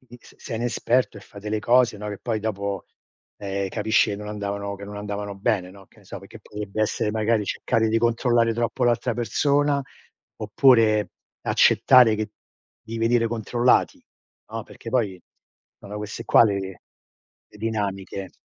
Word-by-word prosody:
all'iniz 120 -1 -17
sei 115 - -6
inesperto 120 0 0
e - - -13
fai 100 +1 -14
delle 105 +1 -3
cose, 120 0 +3
no, 105 +1 -5
che 105 - -5
poi 115 -3 -2
dopo, 100 -2 -3 0.5
ehm, 100 -1 -3
capisci 110 +2 +2
che 100 - -3
non 105 +1 -8
andavano 100 -1 -4
che 100 - -9
non 105 0 -8
andavano 105 0 -5
bene, 100 -2 -1
no, 100 +1 -15
che - - -25
ne - - -20
so, - - -7
perché - - -13
potrebbe 105 0 -6
essere, 110 0 0
magari, 110 0 +1
cercare 110 +2 0
di 115 +1 +2
controllare 115 0 +2
troppo 120 +2 -1
l'altra 120 -1 +1
persona, 140 +4 +1 0.5
oppure 110 -1 +3 0.3
accettare 125 -4 +5
che 110 0 -3 0.5
di 115 0 -7
venire 115 +1 +2
controllati, 120 +2 +1 0.5
no, - - -4
perché - - -12
poi 105 -8 -1 0.6
sono 105 +1 -8
queste 105 0 -6
qua - - +6
le 95 -3 -2 0.7
le - - -15
dinamiche. 100 -3 -3
110 Hz, 160 wpm, -24 LUFS, 100-115 Hz, 0.7 s, qua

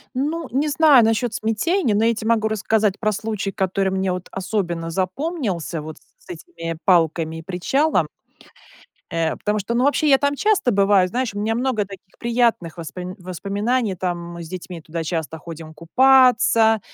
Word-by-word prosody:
Ну, 305 +4 -2
не 275 +5 +1
знаю 290 -4 +6
насчет 225 +1 +1
смятения, 225 - 0
но 215 +2 +2
я 230 - +3
те 220 -1 -6
могу 225 -1 +2
рассказать 215 -1 0
про 215 -1 +1
случай, 210 -1 -3
который 195 -1 0
мне 190 0 -1
вот 180 0 -5
особенно 180 -4 -3
запомнился 185 - -2
вот 155 +1 -8
с - - -22 0.2
с - - -23
этими 255 - -7
палками 165 -2 +2
и - - -8
причалом. 195 - 0 1.0
Э, 165 -1 0
потому 210 0 -1
что, 210 +4 -3
ну, 240 +1 +2
вообще 290 +2 +2
я 270 - +7
там 285 +1 0
часто 420 - +2
бываю. 200 -2 +4
Знаешь, 240 +3 -2
у 205 - -5
меня 220 +2 0
много 240 -4 0
таких 195 -1 -14
приятных 230 -8 0
воспом 180 +3 -7
воспоминаний. 200 +5 -2
Там 175 -1 -2 0.2
мы 170 0 -7
с 160 - -10
детьми 180 -1 -7
туда 165 +1 -5
часто 160 -1 -3
ходим 160 0 -10
купаться, 230 +3 +4
205 Hz, 175 wpm, -21 LUFS, 180-245 Hz, 1.0 s, я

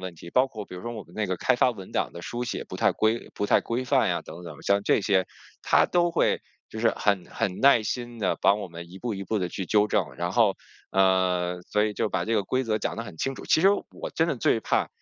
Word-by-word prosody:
问 90 -2 -6
题。 85 - -11
包 130 +8 +4
括 110 -6 -8
比 - - -10
如 90 - -8
说 120 - -4
我 110 -3 -6
们 85 - -19
那 110 -1 -1
个 90 -1 -2
开 - - +2
发 125 - +4
文 95 -6 -9
档 - - -1
的 85 - -8
书 120 +7 -4
写 - - -4
不 - - -6
太 - - +3
规 110 +2 0
不 105 - -2
太 - - +4
规 120 +2 -2
范 135 -1 +3
呀 85 -2 0
等 85 +3 -10
等。 80 -4 -9
像 100 0 +2
这 100 - +3
些， 95 -2 +2 0.4
他 - - +4
都 175 -1 +2
会 165 - +1 0.3
就 110 - -8
是 115 0 +3
很 100 -4 +1
很 90 -1 -3
耐 135 -4 +6
心 120 +1 -4
地 100 -4 0
帮 100 - +4
我 100 - -4
们 85 0 -10
一 95 - -10
步 120 +2 -3
一 100 - -5
步 110 +3 -1
地 90 -2 -1
去 95 - -4
纠 105 +2 +3
正， 105 -3 -1
然 85 +1 -2
后 110 -5 +3 0.3
呃， 90 -2 +2
所 105 0 +2
以 110 - -1
就 - - -4
是 - - +1
把 90 -3 -1
这 115 - 0
个 105 - +2
规 130 +6 0
则 110 -2 0
讲 - - -3
得 115 - -3
很 100 - -9
清 135 +9 -1
楚。 - - -10
其 - - +3
实 190 - +6 0.2
我 - - -6
真 - - +2
的 - - +1
最 - - +2
怕 - - 0
105 Hz, 305 characters per minute, -26 LUFS, 90-120 Hz, 0.4 s, 耐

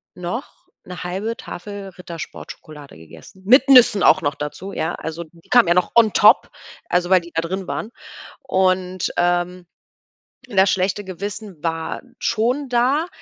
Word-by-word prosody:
noch 180 +8 -7 0.2
1/2 185 +5 -5
Tafel 200 +2 -8
Rittersport-Schokolade 155 - -10
gegessen, 80 - -15
mit 255 +5 +5
Nüssen 245 -6 +7
auch 185 - +5
noch 145 0 0
dazu, 160 +8 -7
ja, 160 - -2
also 160 +1 -6
die 165 +1 -23
kamen 240 -7 +5
ja 175 - +3
noch 180 - +1
on 225 -3 +5
top, 210 - +5 0.4
also 180 +1 0
weil 185 - +6
die 170 0 -13
da 165 - +1
drin 190 +2 -4
waren. 220 - -4 0.5
Und, 185 -1 0
ähm, 175 0 0 0.8
das 195 -2 +3
schlechte 190 +2 -1
Gewissen 195 -2 -7
war 165 -1 -3 0.2
schon 250 +5 -1
da, 255 +7 +1
185 Hz, 145 wpm, -20 LUFS, 170-210 Hz, 0.8 s, Nüssen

